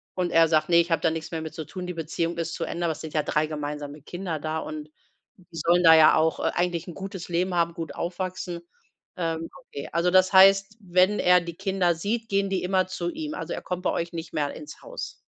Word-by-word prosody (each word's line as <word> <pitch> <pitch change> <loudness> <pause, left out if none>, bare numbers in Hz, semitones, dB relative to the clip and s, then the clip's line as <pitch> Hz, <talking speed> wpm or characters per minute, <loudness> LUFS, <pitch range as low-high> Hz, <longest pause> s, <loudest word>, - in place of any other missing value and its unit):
und 180 -1 -1
er 165 0 +5
sagt: 155 +1 +2
„Ne, 170 - +5
ich 170 0 +3
habe 165 - +2
da 165 - +3
nix 160 +1 -5
mehr 160 -1 -3
mit 160 - -7
zu 160 - -5
tun, 180 -1 -7
die 180 - -4
Beziehung 165 +1 -3
ist 165 0 -3
zu - - -3
Ende.“ 170 0 -3
Aber 165 - +1
es - - -11
sind 160 - -8
ja 150 -2 +1
3 150 +1 0
gemeinsame 150 -1 -5
Kinder 175 -2 -5
da 155 +1 -3
und 155 -1 -7 0.5
die 180 - -21
sollen 175 +3 +3
da 160 -1 +9
ja 155 -1 +7
auch, 160 +1 +2
äh, - - 0
eigentlich 175 -1 -1
'n 175 - -7
gutes 190 -2 -7
Leben 180 +2 0
haben, 170 -1 +1
gut 165 -1 -6
aufwachsen. 180 0 -4 0.6
Ähm, 165 -1 -2
okay. 140 - -8
Also, 170 +2 +1
das 185 +1 +5
heißt, 195 +2 +6
wenn 185 +2 +2
er 180 0 +5
die 170 -1 -7
Kinder 190 -3 +1
sieht, 225 +6 -3
gehen 195 0 +1
die 190 -2 -1
immer 185 0 +1
zu 175 -2 -3
ihm. 305 -1 -5
Also, - - -5
er - - -5
kommt 180 0 -5
bei - - +1
euch 170 +1 -3
nicht 165 -1 -6
mehr 145 -1 0
l - - -9
ins 150 - -11
Haus. - - -7
170 Hz, 250 wpm, -26 LUFS, 160-185 Hz, 0.6 s, da